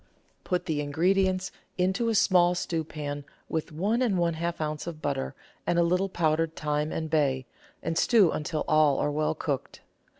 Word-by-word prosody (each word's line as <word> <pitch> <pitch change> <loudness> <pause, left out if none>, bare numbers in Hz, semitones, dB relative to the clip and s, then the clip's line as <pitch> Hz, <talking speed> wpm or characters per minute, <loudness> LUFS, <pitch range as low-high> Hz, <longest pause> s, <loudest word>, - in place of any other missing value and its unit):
Put 180 -2 -1
the 155 -3 -1
ingredients 185 +5 +1 0.3
into 190 +6 +1
a 225 - +1
small 180 -3 +4
stewpan 155 -4 -3 0.2
with 160 0 -3
one 205 +10 0
and 220 -7 +2
one 170 -1 +2
half 170 +1 -3
oz. 155 +1 -3
of 165 -3 -5
butter 65 - -2 0.3
and 175 - +2
a 170 - +5
little 180 +3 +1
powdered 160 -2 +1
thyme 150 0 -1
and 160 - -2
bay, 140 -4 +1 0.4
and 165 - -1
stew 210 -1 +5
until 155 0 -2
all 155 -2 +4
are 145 - 0
well 155 +1 0
cooked. 140 -4 -4
165 Hz, 170 wpm, -28 LUFS, 150-180 Hz, 0.4 s, a